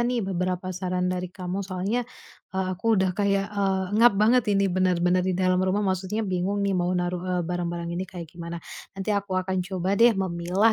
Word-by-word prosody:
nih 240 -3 0
beberapa 185 0 -2
saran 180 0 -2
dari 180 0 -3
kamu. 180 +1 -4
Soalnya, 190 +6 -1 0.5
eee, 190 0 -2
aku 220 +4 +1
udah 190 -1 +2
kayak, 200 0 +1
eee, 195 -2 +1
pengap 220 0 +5
banget 220 +2 +4
ini 195 -2 +2
benar-benar 180 -1 +2
di 185 0 0
dalam 185 0 +2
rumah. 190 +2 +1
Maksudnya 190 +3 -1
bingung 190 +2 -1
nih 200 - +1
mau 180 -1 +1
naruh 175 0 -1
e 185 - 0
barang-barang 170 -1 -3
ini 180 +2 -2
kayak 175 -2 -7
gimana. 170 0 -6 0.4
Nanti 195 +2 -1
aku 200 -2 -1
akan 185 0 0
coba 190 0 -1
deh 235 -2 +6
memilah 185 +3 +2
185 Hz, 190 wpm, -26 LUFS, 180-200 Hz, 0.5 s, deh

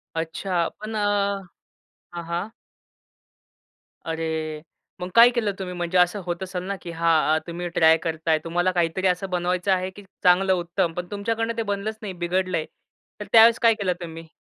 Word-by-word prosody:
अच्छा. 170 +1 -1
पण 215 +1 -6
अ, - - 0 1.1
हां, 170 -1 -5
हां. 175 +6 -3 1.5
अरे, 160 -1 -3 0.4
मग 180 - -4
काय 235 +1 +9
केलं 215 -4 +1
तुम्ही? 180 -1 -5
म्हणजे 175 +1 -1
असं 180 +3 +3
होत 175 +1 -3
असेल 180 -1 -5
ना, 200 +1 -3
की 170 - -7
हां, 165 -2 +2
अ, - - +3
तुम्ही 175 +1 -4
ट्राय 160 0 +6
करताय. 160 -1 0
तुम्हाला 175 +2 0
काहीतरी 175 +2 0
असं 185 +1 0
बनवायचं 180 +1 0
आहे 185 0 +1
की 205 +1 -13 0.2
चांगलं 185 +1 +4
उत्तम. 175 -1 -1
पण 180 +1 -5
तुमच्याकडून 225 +3 -2
ते 230 - 0
बनलंच 205 +1 -3
नाही, 200 -3 -5
बिघडलंय. 175 -1 -1 0.5
तर 210 - -5
त्यावेळेस 230 0 +7
काय 230 -1 +6
केलं 195 -4 -1
तुम्ही? 165 -1 -8
180 Hz, 165 wpm, -24 LUFS, 170-200 Hz, 1.5 s, काय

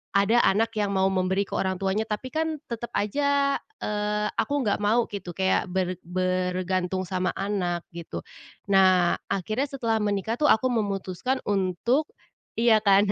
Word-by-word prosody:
ada 200 +4 +4
anak 220 +4 +2
yang 200 -1 0
mau 190 0 +3
memberi 190 +1 +1
ke - - -17
orang 190 0 0
tuanya 195 +3 0
tapi 220 +5 -4
kan 320 0 -1 0.2
tetep 235 +1 -4
aja, 280 +5 +1 0.2
eee, 210 0 -1
aku 285 -2 +1
nggak 205 -2 +1
mau 220 +3 +3
gitu 185 -4 -6
kayak 190 -1 +1
ber 185 -1 -2
bergantung 185 0 -1
sama 185 0 -2
anak 185 -4 -2
gitu. 170 -1 -7 0.5
Nah, 185 -2 +4
akhirnya 215 +9 -1
setelah 230 -5 -1
menikah 210 +2 -1
tuh 300 - +4
aku 255 +1 +4
memutuskan 205 +2 -2
untuk 200 - 0 0.5
iya 230 -2 +5
kan. 200 0 +5
200 Hz, 150 wpm, -26 LUFS, 185-230 Hz, 0.5 s, iya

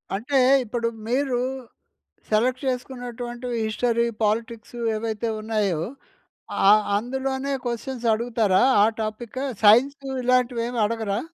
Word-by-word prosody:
అంటే 260 +6 0 0.2
ఇప్పుడు 230 0 -2 0.2
మీరు 255 0 0 0.9
సెలెక్ట్ 250 +4 +1
చేసుకున్నటువంటివి 245 -1 -4
హిస్టరీ, 235 +1 +1 0.2
పాలిటిక్సు 225 +2 -2 0.2
ఏవైతే 225 +1 -2
ఉన్నాయో. 210 -7 0 0.9
ఆహ్, 210 +1 +6
అందులోనే 265 +4 -2
క్వషన్స్ 240 +1 -4
అడుగుతారా? 220 -4 +1 0.2
ఆ - - +6 0.2
టాపిక్ 220 +3 -5 0.2
సైన్సు 265 +7 +5 0.2
ఇలాంటివి 250 -1 +2
ఏమి 240 -1 -3
అడగరా? 220 -2 -2
235 Hz, 100 wpm, -24 LUFS, 215-250 Hz, 0.9 s, ఆహ్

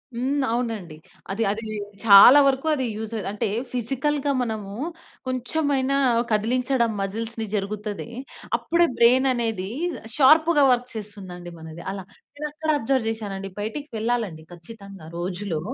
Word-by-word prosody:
హ్మ్. 270 +4 0
అవునండి. 225 -9 -3 0.4
అది 210 +4 -1
అది 220 +2 -5 0.4
చాలా 225 +6 +10
వరకు 270 +3 0
అది 260 -3 -1
యూజ్ 220 +1 -6 0.2
అంటే, 210 +2 -2 0.3
ఫిజికల్‌గా 275 +4 -1
మనము 215 -4 -4 0.5
కొంచెమైనా 270 +1 0 0.3
కదిలించడం 235 +2 +1
మజిల్స్‌ని 225 +3 -3
జరుగుతది. 205 +1 -4 0.5
అప్పుడే 340 0 +2
బ్రైన్ 255 +3 +5
అనేది 225 -6 -2 0.5
షార్ప్‌గా 310 +2 +5
వర్క్ 245 0 0
చేస్తుందండి 190 -5 -8
మనది. 160 +1 -10
అలా 195 -1 -6 0.3
నేను 300 +1 -3
అక్కడ 310 +1 -5
అబ్జర్వ్ 260 -2 0
చేశానండి 200 -3 -5
బయటికి 225 +8 -5
వెళ్ళాలండి 220 -8 -2
ఖచ్చితంగా. 195 0 -12
రోజులో 180 -1 -3
225 Hz, 120 wpm, -24 LUFS, 200-260 Hz, 0.5 s, చాలా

